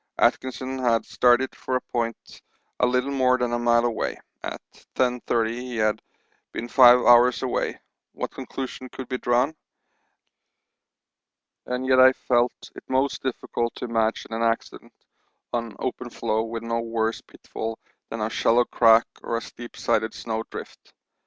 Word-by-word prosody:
Atkinson 130 0 0
had 115 -3 +2
started 125 +1 +2
for 130 - -3
a 125 - +1
point 115 -2 -3 0.4
a 125 - +4
little 125 +2 0
more 130 -2 +3
than 125 -1 -1
a 120 - 0
mile 120 0 +3
away; 115 -2 -2 0.2
at - - -5 0.4
10.30 120 -3 +1
he 125 +1 -6
had 110 -1 +1 0.5
been 120 - -4
five 125 -1 +8
hours 120 0 +5
away; - - -1 0.3
what - - -4
conclusion 130 -1 -6
could 130 0 -8
be 130 0 -3
drawn? 125 +5 +2 2.1
And 125 +1 -2
yet 130 0 +4
I 130 0 +8
felt 120 -1 0
it - - -10
most 130 +1 0
difficult 120 -2 -3
to - - -5
imagine 115 -1 -1
an 115 - -2
accident 115 0 -2 0.6
on 115 -2 -3
open 125 -1 -4
floe 110 -1 -1
with 115 0 -5
no 115 0 -1
worse 115 -1 -1
pitfall 115 0 -7 0.3
than 115 - -5
a 110 - 0
shallow 120 +2 +3
crack 115 -1 +5 0.2
or 115 - -2
steep 120 0 -11
sided 110 0 0
snow 110 -1 -3
drift. - - -10
120 Hz, 150 wpm, -24 LUFS, 115-125 Hz, 2.1 s, five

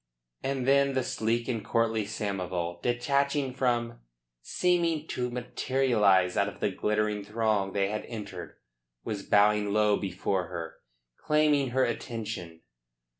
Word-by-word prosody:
And 135 -2 -2
then 140 0 +4
the 130 - +1
sleek 115 0 -1
and 115 -4 -2
courtly 115 -2 +1
Samoval, 90 -5 -3
detaching 140 - 0
from, 120 - 0 0.4
seeming 170 - +1
to 125 0 -2
materialise 120 -6 +2
out 100 - +2
of, 100 - -8
the 100 - 0
glittering 105 +1 0
throng 105 -2 0
they 100 -1 +1
had 105 - -3
entered, 100 -6 -7 0.5
was 105 -2 -4
bowing 105 0 +3
low 105 0 +3
before 95 -1 -2
her, 85 -2 -6 0.4
claiming 150 -3 +2
her 130 +2 +2
attention. 100 -9 -5
110 Hz, 125 wpm, -28 LUFS, 100-130 Hz, 0.5 s, then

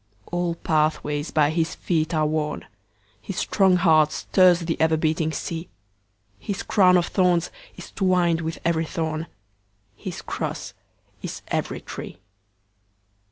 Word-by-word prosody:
All 175 -1 -1
pathways 150 -2 0
by 150 -1 +3
his 165 0 -1
feet 160 -2 -1
are 155 -2 +1
worn, 150 0 -2 0.6
His 195 - -6
strong 190 -2 +3
heart 160 -4 +4
stirs 185 -2 +4
the 165 -1 -2
ever 160 0 +3
beating 160 0 0
sea, 165 +2 -5 0.7
His 200 - -4
crown 185 -3 +5
of 175 - +2
thorns 180 -3 +1 0.3
is - - -10
twined 180 -4 +2
with 160 0 -4
every 165 -1 +1
thorn, 160 -1 -3 0.7
His - - -7
cross - - -4 0.5
is - - -6
every - - -2
tree. - - -8
165 Hz, 130 wpm, -24 LUFS, 155-180 Hz, 0.7 s, crown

